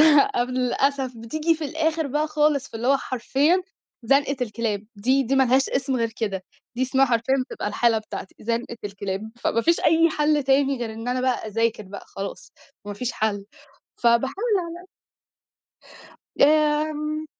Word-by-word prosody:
لأ، 260 Hz, -4 st, +3 dB
للأسف 255 Hz, 0 st, 0 dB
بتيجي 310 Hz, +8 st, 0 dB
في 315 Hz, -1 st, -5 dB
الآخر 315 Hz, +1 st, -1 dB
بقى 300 Hz, +3 st, 0 dB
خالص، 300 Hz, -2 st, +1 dB
فاللي 230 Hz, +2 st, -4 dB
هو 275 Hz, +1 st, +5 dB
حرفيًا 275 Hz, +8 st, +1 dB, 0.4 s
زنقة 280 Hz, +3 st, +2 dB
الكلاب، 215 Hz, -3 st, -2 dB
دي 260 Hz, +7 st, +2 dB
دي 265 Hz, +2 st, 0 dB
ما 270 Hz, -, +5 dB
لهاش 260 Hz, +2 st, +3 dB
اسم 265 Hz, 0 st, -1 dB
غير 230 Hz, -2 st, 0 dB
كده، 195 Hz, -4 st, -2 dB, 0.3 s
دي 250 Hz, -, -2 dB
اسمها 265 Hz, +1 st, +3 dB
حرفيًا 240 Hz, +1 st, +1 dB, 0.2 s
بتبقى -, -, -4 dB
الحالة 225 Hz, +2 st, +2 dB
بتاعتي، 215 Hz, -3 st, -7 dB
زنقة 235 Hz, +1 st, -3 dB
الكلاب. 200 Hz, +1 st, -5 dB
فما 230 Hz, -, +1 dB
فيش 335 Hz, +7 st, +3 dB
أي 330 Hz, +1 st, +4 dB
حَل 300 Hz, -1 st, +1 dB
تاني 270 Hz, 0 st, +2 dB
غير 230 Hz, -2 st, -4 dB
إن 225 Hz, +2 st, -7 dB
أنا 250 Hz, +1 st, 0 dB
بقى 255 Hz, -3 st, 0 dB
أذاكر 225 Hz, 0 st, 0 dB
بقى 200 Hz, +1 st, -10 dB
خلاص، 195 Hz, 0 st, -7 dB, 0.3 s
ما 205 Hz, -, -5 dB
فيش 240 Hz, +4 st, -3 dB
حَل. 205 Hz, -2 st, -2 dB, 0.6 s
فباحاول 235 Hz, +3 st, +3 dB, 0.3 s
على 340 Hz, 0 st, -7 dB
قد -, -, -17 dB, 1.6 s
آمم، 305 Hz, +1 st, +2 dB
260 Hz, 160 wpm, -24 LUFS, 230-295 Hz, 1.6 s, هو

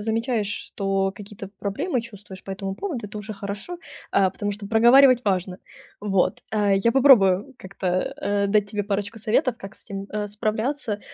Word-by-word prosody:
замечаешь, 225 Hz, 0 st, -1 dB
что 195 Hz, -1 st, -2 dB
какие-то 200 Hz, -1 st, -9 dB
проблемы, 245 Hz, -, -2 dB
чувствуешь 205 Hz, -4 st, -11 dB
по -, -, -8 dB
этому 195 Hz, 0 st, -4 dB
поводу- 265 Hz, -, -4 dB
это 210 Hz, -, -10 dB
уже 210 Hz, +1 st, -6 dB
хорошо, 205 Hz, -, -6 dB, 0.3 s
э, 190 Hz, -2 st, +4 dB
потому 205 Hz, +2 st, -3 dB
что 200 Hz, 0 st, -8 dB
проговаривать 245 Hz, +3 st, +6 dB
важно. 185 Hz, -2 st, -1 dB, 0.4 s
Вот. 195 Hz, -3 st, 0 dB
Э, 205 Hz, -2 st, +3 dB
я 230 Hz, +4 st, +2 dB
попробую 250 Hz, -4 st, +5 dB
как-то, 190 Hz, 0 st, -7 dB, 0.3 s
э, 200 Hz, 0 st, 0 dB
дать 205 Hz, 0 st, +2 dB
тебе 205 Hz, 0 st, -1 dB
парочку 205 Hz, +2 st, -3 dB
советов, 235 Hz, +4 st, +1 dB
как 195 Hz, -, -9 dB
с -, -, -17 dB
этим, 195 Hz, -1 st, -6 dB
э, 210 Hz, -1 st, -2 dB
справляться, 215 Hz, +2 st, -2 dB
205 Hz, 165 wpm, -24 LUFS, 195-230 Hz, 0.4 s, проговаривать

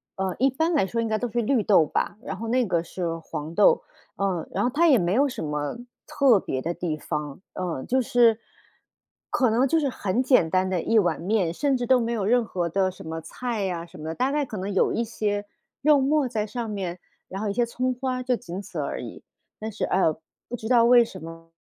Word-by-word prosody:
呃， 190 Hz, -1 st, -2 dB
一 270 Hz, +1 st, +4 dB
般 320 Hz, +6 st, 0 dB
来 280 Hz, -, +3 dB
说 230 Hz, +2 st, -1 dB
应 225 Hz, -, -1 dB
该 215 Hz, 0 st, 0 dB
都 245 Hz, +1 st, -3 dB
是 240 Hz, +2 st, 0 dB
绿 240 Hz, +1 st, +2 dB
豆 180 Hz, -7 st, +5 dB
吧， 205 Hz, -, -2 dB
然 195 Hz, -, -5 dB
后 230 Hz, -, -5 dB
那 250 Hz, +1 st, +2 dB
个 175 Hz, -4 st, +1 dB
是 170 Hz, -1 st, -4 dB
黄 160 Hz, 0 st, -6 dB
豆。 480 Hz, -, +4 dB, 0.3 s
呃， 190 Hz, -4 st, -1 dB
然 -, -, -1 dB
后 245 Hz, -, +2 dB
它 335 Hz, +3 st, +4 dB
也 275 Hz, -, +6 dB
没 175 Hz, -2 st, +1 dB
有 280 Hz, +5 st, +4 dB
什 245 Hz, -, -5 dB
么 150 Hz, +5 st, -3 dB, 0.3 s
特 275 Hz, -8 st, +4 dB
别 130 Hz, -7 st, -3 dB
的 170 Hz, +5 st, -2 dB
地 165 Hz, -4 st, -3 dB
方， 150 Hz, -1 st, -4 dB
呃， 170 Hz, -7 st, -3 dB
就 260 Hz, +1 st, +1 dB
是， 240 Hz, -3 st, +4 dB, 0.9 s
可 250 Hz, -4 st, +2 dB
能 250 Hz, +4 st, +3 dB
就 325 Hz, +4 st, +2 dB
是 285 Hz, -, 0 dB
很 235 Hz, +1 st, -1 dB
简 250 Hz, -, +4 dB
单 185 Hz, +2 st, +2 dB
的 180 Hz, -3 st, 0 dB
一 225 Hz, -, +2 dB
碗 180 Hz, -5 st, +2 dB
面， 185 Hz, -3 st, +1 dB
甚 275 Hz, +4 st, +1 dB
至 245 Hz, -, -2 dB
都 255 Hz, +1 st, +4 dB
没 230 Hz, 0 st, -1 dB
有 210 Hz, -4 st, -1 dB
任 240 Hz, +3 st, +3 dB
何 175 Hz, -4 st, -2 dB
的 190 Hz, +2 st, +1 dB
什 185 Hz, -, -11 dB
么 160 Hz, 0 st, -4 dB
菜 215 Hz, +3 st, -3 dB
啊 170 Hz, -1 st, -4 dB
什 170 Hz, -, -14 dB
么， 160 Hz, +1 st, -5 dB
大 260 Hz, +2 st, +1 dB
概 295 Hz, 0 st, +1 dB
可 215 Hz, -, -7 dB
能 195 Hz, +2 st, -3 dB
有 190 Hz, -, +3 dB
一 230 Hz, -, 0 dB
些 205 Hz, -2 st, -2 dB, 0.4 s
肉 295 Hz, -1 st, +5 dB
沫 285 Hz, 0 st, +2 dB
在 220 Hz, -3 st, -2 dB
上 235 Hz, +2 st, -4 dB
面， 185 Hz, -4 st, -4 dB, 0.3 s
然 190 Hz, -, -6 dB
后 210 Hz, -, -1 dB
一 -, -, -1 dB
些 240 Hz, +3 st, +2 dB
葱 255 Hz, +2 st, -1 dB
花， 255 Hz, 0 st, -3 dB
就 250 Hz, -1 st, +1 dB
仅 190 Hz, -6 st, -7 dB
此 -, -, -7 dB
而 -, -, -3 dB
已。 -, -, -9 dB, 0.4 s
但 220 Hz, +1 st, -5 dB
是 210 Hz, -, -2 dB
呃， 165 Hz, -5 st, +2 dB, 0.3 s
不 245 Hz, -, -3 dB
知 220 Hz, -, -6 dB
道 240 Hz, -1 st, +5 dB
为 240 Hz, 0 st, +6 dB
什 185 Hz, -6 st, -10 dB
么， 165 Hz, 0 st, -11 dB
215 Hz, 260 characters per minute, -25 LUFS, 180-250 Hz, 0.9 s, 也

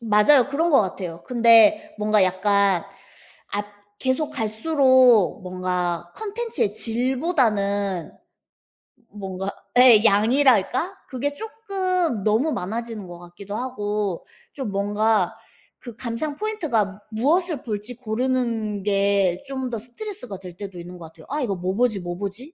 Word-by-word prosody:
맞아요. 230 Hz, +5 st, +4 dB
그런 320 Hz, +5 st, 0 dB
것 280 Hz, -, +6 dB
같아요. 180 Hz, -4 st, -4 dB
근데 230 Hz, -3 st, +4 dB
뭔가 210 Hz, -1 st, +3 dB
약간 195 Hz, 0 st, +2 dB, 0.7 s
앗 205 Hz, 0 st, -2 dB, 0.3 s
계속 260 Hz, +3 st, -1 dB
갈수록 255 Hz, -, +3 dB
뭔가 180 Hz, -2 st, -3 dB
콘텐츠의 440 Hz, -, -2 dB
질보다는 220 Hz, -, 0 dB, 1.0 s
뭔가 195 Hz, -1 st, -5 dB, 0.3 s
예 240 Hz, -4 st, +8 dB
양이랄까? 250 Hz, -, +3 dB
그게 275 Hz, +3 st, -2 dB
쪼끔 370 Hz, -, -2 dB
너무 225 Hz, +10 st, +2 dB
많아지는 220 Hz, -1 st, -4 dB
것 175 Hz, 0 st, -9 dB
같기도 175 Hz, +4 st, -9 dB
하고 210 Hz, -6 st, -3 dB, 0.3 s
좀 265 Hz, -7 st, -5 dB
뭔가 205 Hz, 0 st, +1 dB, 0.4 s
그 240 Hz, -3 st, -10 dB
감상 255 Hz, +6 st, -4 dB
포인트가 240 Hz, -, -1 dB
무엇을 300 Hz, +7 st, 0 dB
볼지 215 Hz, +2 st, -5 dB
고르는 230 Hz, -3 st, -2 dB
게 200 Hz, -2 st, +1 dB
좀 265 Hz, -2 st, -4 dB
더 230 Hz, -, -3 dB
스트레스가 250 Hz, -, -7 dB
될 180 Hz, -2 st, -10 dB
때도 195 Hz, -3 st, -8 dB
있는 175 Hz, +1 st, -9 dB
것 170 Hz, -, -9 dB
같아요. 160 Hz, -1 st, -17 dB
'아 295 Hz, +2 st, -2 dB
이거 215 Hz, -7 st, -1 dB
뭐 180 Hz, +1 st, -3 dB
보지 225 Hz, -4 st, +1 dB
뭐 175 Hz, 0 st, -5 dB
보지?' 205 Hz, -, -6 dB
220 Hz, 260 characters per minute, -23 LUFS, 200-260 Hz, 1.0 s, 예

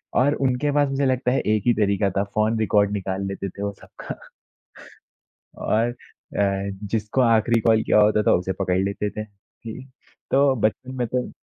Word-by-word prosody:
और 140 Hz, +4 st, +4 dB
उनके 135 Hz, +1 st, 0 dB
पास 145 Hz, -1 st, +2 dB
मुझे 135 Hz, +1 st, 0 dB
लगता 130 Hz, -1 st, +1 dB
है 135 Hz, -, +2 dB
एक 105 Hz, -2 st, 0 dB
ही 120 Hz, -, +6 dB
तरीका 100 Hz, -2 st, +1 dB
था 100 Hz, -, +2 dB
फ़ोन 110 Hz, +2 st, 0 dB
रिकॉर्ड 105 Hz, -2 st, +2 dB
निकाल 95 Hz, -1 st, -3 dB
लेते 100 Hz, 0 st, -4 dB
थे 100 Hz, +3 st, -8 dB
वो 100 Hz, -, -1 dB
सबका। -, -, -9 dB, 1.4 s
और 115 Hz, +2 st, +1 dB
अ, 100 Hz, -4 st, -3 dB, 0.2 s
जिसको 110 Hz, +3 st, 0 dB
आखिरी 115 Hz, -1 st, +3 dB
कॉल 110 Hz, 0 st, +3 dB
किया -, -, +3 dB
होता 105 Hz, 0 st, +4 dB
था -, -, +3 dB
उसे 95 Hz, +1 st, -3 dB
पकड़ 90 Hz, -1 st, -1 dB
लेते 100 Hz, +1 st, -2 dB
थे। 110 Hz, -, -5 dB
जी, 110 Hz, +4 st, -12 dB, 0.5 s
तो 140 Hz, 0 st, +4 dB
बचपन 130 Hz, +4 st, -1 dB
में 125 Hz, -1 st, -1 dB
तो 125 Hz, +1 st, -2 dB
110 Hz, 180 wpm, -23 LUFS, 100-125 Hz, 1.4 s, ही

